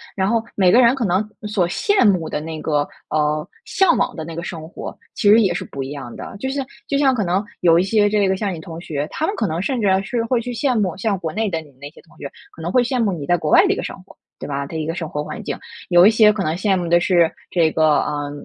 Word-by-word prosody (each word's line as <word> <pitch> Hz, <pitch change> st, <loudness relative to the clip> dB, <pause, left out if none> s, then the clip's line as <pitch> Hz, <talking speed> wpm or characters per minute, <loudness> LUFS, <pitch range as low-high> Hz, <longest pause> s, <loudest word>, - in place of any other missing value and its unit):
然 190 Hz, -1 st, 0 dB
后， 230 Hz, 0 st, +1 dB
每 185 Hz, -3 st, +4 dB
个 245 Hz, -, +6 dB
人 240 Hz, 0 st, +6 dB
可 265 Hz, -, -2 dB
能 190 Hz, +4 st, +1 dB, 0.2 s
所 200 Hz, -5 st, +1 dB
羡 400 Hz, -, +2 dB
慕 180 Hz, -6 st, +2 dB
的 -, -, -2 dB
那 155 Hz, 0 st, -6 dB
个， 150 Hz, -2 st, 0 dB, 0.2 s
呃， 150 Hz, 0 st, 0 dB, 0.2 s
向 385 Hz, -4 st, +3 dB
往 -, -, 0 dB
的 160 Hz, -, -5 dB
那 165 Hz, 0 st, -8 dB
个 170 Hz, -, -5 dB
生 160 Hz, -2 st, -7 dB
活 -, -, -8 dB, 0.2 s
其 240 Hz, -6 st, 0 dB
实 220 Hz, +2 st, +7 dB
也 195 Hz, -4 st, +2 dB
是 -, -, -4 dB
不 135 Hz, -, -7 dB
一 135 Hz, -, -5 dB
样 140 Hz, -4 st, -8 dB
的， -, -, -8 dB
就 265 Hz, -, -3 dB
像 275 Hz, 0 st, -2 dB, 0.2 s
就 280 Hz, -, 0 dB
像 270 Hz, -2 st, +3 dB
可 215 Hz, -, 0 dB
能 185 Hz, +3 st, 0 dB, 0.2 s
有 170 Hz, -1 st, +5 dB
一 180 Hz, -, +2 dB
些 205 Hz, +1 st, +2 dB
这 205 Hz, -2 st, +2 dB
个 190 Hz, -, +1 dB
像 200 Hz, -2 st, -2 dB
你 165 Hz, -, -7 dB
同 165 Hz, 0 st, -9 dB
学， 150 Hz, -3 st, -4 dB
他 315 Hz, -, -2 dB
们 400 Hz, +5 st, -2 dB
可 215 Hz, -, -1 dB
能 160 Hz, +1 st, -2 dB
甚 240 Hz, +5 st, -1 dB
至 205 Hz, -, +1 dB, 0.2 s
是 235 Hz, +2 st, -2 dB
会 240 Hz, +1 st, +1 dB
去 245 Hz, +1 st, -5 dB
羡 250 Hz, -1 st, 0 dB
慕 185 Hz, -4 st, -1 dB
像 200 Hz, 0 st, -1 dB
国 160 Hz, -3 st, -5 dB
内 215 Hz, 0 st, -1 dB
的 165 Hz, -2 st, -2 dB
你 150 Hz, -2 st, -17 dB
那 145 Hz, -, -7 dB
些 150 Hz, -, -18 dB
同 165 Hz, -, -23 dB
学， 140 Hz, -, -7 dB, 0.2 s
可 165 Hz, -, -11 dB
能 170 Hz, +2 st, -3 dB
会 250 Hz, +2 st, +4 dB
羡 250 Hz, 0 st, -1 dB
慕 205 Hz, -, +1 dB
你 155 Hz, -5 st, -5 dB
在 175 Hz, +4 st, +2 dB
国 155 Hz, -2 st, -3 dB
外 365 Hz, -, +6 dB
的 390 Hz, -, +2 dB
一 -, -, -4 dB
个 -, -, -4 dB
生 -, -, -5 dB
活， -, -, -18 dB, 0.2 s
对 -, -, -6 dB
吧？ 140 Hz, 0 st, -3 dB
的 160 Hz, -, -6 dB
一 155 Hz, -, -3 dB
个 165 Hz, -, -2 dB
生 160 Hz, -3 st, -4 dB
活 150 Hz, 0 st, -3 dB
环 -, -, -7 dB
境； -, -, -3 dB, 0.3 s
有 175 Hz, +1 st, +7 dB
一 -, -, +8 dB
些 215 Hz, -1 st, +6 dB
可 205 Hz, -2 st, -2 dB
能 155 Hz, +2 st, -1 dB
羡 195 Hz, +1 st, +1 dB
慕 175 Hz, -2 st, -3 dB
的 175 Hz, +1 st, +4 dB
是 175 Hz, -2 st, +3 dB, 0.2 s
这 165 Hz, -3 st, +2 dB
个， 155 Hz, -2 st, +3 dB
呃， 145 Hz, -1 st, -3 dB
180 Hz, 320 characters per minute, -20 LUFS, 160-220 Hz, 0.3 s, 一